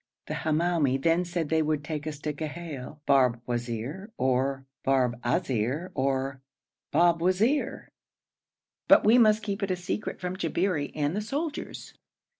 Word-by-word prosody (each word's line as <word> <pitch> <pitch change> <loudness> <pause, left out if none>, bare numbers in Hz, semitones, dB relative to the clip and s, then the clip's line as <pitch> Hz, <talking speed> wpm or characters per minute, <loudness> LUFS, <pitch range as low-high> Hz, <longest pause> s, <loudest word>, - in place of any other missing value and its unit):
The - - -4
Hamoumi 155 -4 +1
then 165 +5 +2
said 170 -3 -2
they 160 0 +3
would 155 -1 0
take 150 0 -4
us 150 -2 -4
to 150 0 -2
Ghail 150 -2 -6
Barbwazir 120 - 0
or 130 +1 0 0.2
Barbazir 130 +3 0
or 135 0 -1 0.5
Babwazir, 180 - +2 1.0
but - - +7
we 230 +4 +7
must 215 -1 +5
keep 205 0 -3
it 200 - -1
a 185 - +1
secret 180 +4 -4
from 180 0 -3
the 185 - -9
Jabberi 175 -7 0
and 150 +2 0
the 210 - -1
soldiers. 290 +7 -4
155 Hz, 135 wpm, -28 LUFS, 135-180 Hz, 1.0 s, but